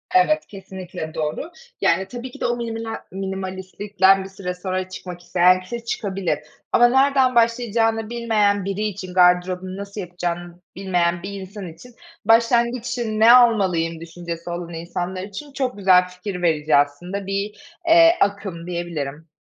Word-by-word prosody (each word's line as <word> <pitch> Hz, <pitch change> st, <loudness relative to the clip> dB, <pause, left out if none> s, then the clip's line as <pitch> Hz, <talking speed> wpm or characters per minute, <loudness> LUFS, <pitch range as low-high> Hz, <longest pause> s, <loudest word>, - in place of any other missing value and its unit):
Evet, 310 Hz, -4 st, +4 dB
kesinlikle 185 Hz, -4 st, -8 dB
doğru. 155 Hz, -, -3 dB, 0.3 s
Yani 190 Hz, -, +2 dB
tabii 245 Hz, +3 st, -7 dB
ki -, -, -13 dB
de -, -, 0 dB
o 240 Hz, -, +1 dB
miniminel 225 Hz, -1 st, -4 dB, 0.2 s
minimalistlikten 190 Hz, +1 st, 0 dB
bir 190 Hz, -, -9 dB
süre 190 Hz, -2 st, -5 dB
sonra 185 Hz, 0 st, -3 dB
çıkmak 180 Hz, -1 st, -8 dB
isteyen 180 Hz, +1 st, +4 dB
kişi 230 Hz, +5 st, -7 dB
çıkabilir. 190 Hz, -9 st, -2 dB, 0.3 s
Ama 240 Hz, -, +6 dB
nereden 265 Hz, 0 st, +3 dB
başlayacağını 230 Hz, -1 st, +2 dB
bilmeyen 215 Hz, -4 st, +1 dB
biri 195 Hz, +1 st, -3 dB
için, 195 Hz, -3 st, -4 dB
gardırobunu 180 Hz, +1 st, +2 dB
nasıl 200 Hz, +1 st, -6 dB
yapacağını 175 Hz, -1 st, -5 dB, 0.2 s
bilmeyen 175 Hz, -2 st, 0 dB
bir 200 Hz, 0 st, -6 dB
insan 190 Hz, 0 st, -8 dB
için, 245 Hz, +7 st, -16 dB, 0.3 s
başlangıç 235 Hz, +2 st, +3 dB
için, 235 Hz, -3 st, -2 dB
ne 225 Hz, +2 st, +8 dB
almalıyım 190 Hz, -9 st, +3 dB
düşüncesi 170 Hz, 0 st, -7 dB
olan 175 Hz, 0 st, -5 dB
insanlar 175 Hz, +2 st, -4 dB
için 240 Hz, +9 st, -9 dB
çok 260 Hz, -5 st, -2 dB
güzel 185 Hz, -2 st, +5 dB
fikir 180 Hz, +1 st, -6 dB
verici 155 Hz, -3 st, +2 dB
aslında 175 Hz, +8 st, 0 dB
bir, 200 Hz, +2 st, -3 dB, 0.3 s
eee, 335 Hz, 0 st, +7 dB
akım 195 Hz, -4 st, -1 dB
diyebilirim. 165 Hz, -3 st, -5 dB
190 Hz, 145 wpm, -22 LUFS, 180-225 Hz, 0.3 s, ne